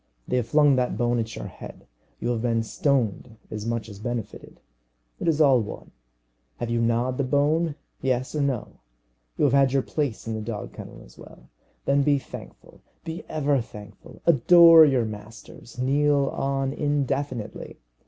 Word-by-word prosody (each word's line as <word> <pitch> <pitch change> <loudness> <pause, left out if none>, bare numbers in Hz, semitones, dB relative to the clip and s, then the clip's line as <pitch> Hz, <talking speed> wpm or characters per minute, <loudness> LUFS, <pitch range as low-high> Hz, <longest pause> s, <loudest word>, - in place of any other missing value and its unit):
They - - 0
have 120 -2 -1
flung 145 0 +4
that 125 -4 0
bone 120 0 +1
at 115 0 -4
your - - -6
head. - - -11 0.3
You 120 - -2
have 120 -2 -1
been 115 -1 0
stoned 125 - -1
as 105 0 -5
much 115 -1 -2
as 100 -2 -11
benefited. 120 +1 -6 0.6
It - - -3
is 160 -2 +2
all 135 -5 +5
one. 105 - -8 0.7
Have 115 - -4
you 120 0 +1
gnawed 120 +3 0
the - - +2
bone 145 +4 +1 0.3
yes 130 -1 -1
or 150 - -1
no? 135 -5 -3 0.6
You - - 0
have - - +3
had 135 -1 +4
your 135 -1 +2
place 145 -8 -3
in 115 - -3
the 110 - -4
dog 105 -1 -6
kennel - - -10
as - - -19
well. - - -15 0.3
Then 140 +1 +3
be 145 0 +3
thankful 135 - -11 0.2
be 165 +1 -6
ever 145 -3 +1
thankful. 105 -2 -13
Adore 165 +2 +8
your 130 -5 +2
masters. 110 +3 -10
Kneel 140 +2 +2
on 135 0 -2
indefinitely. 140 -6 -3
130 Hz, 170 wpm, -25 LUFS, 115-145 Hz, 0.7 s, Adore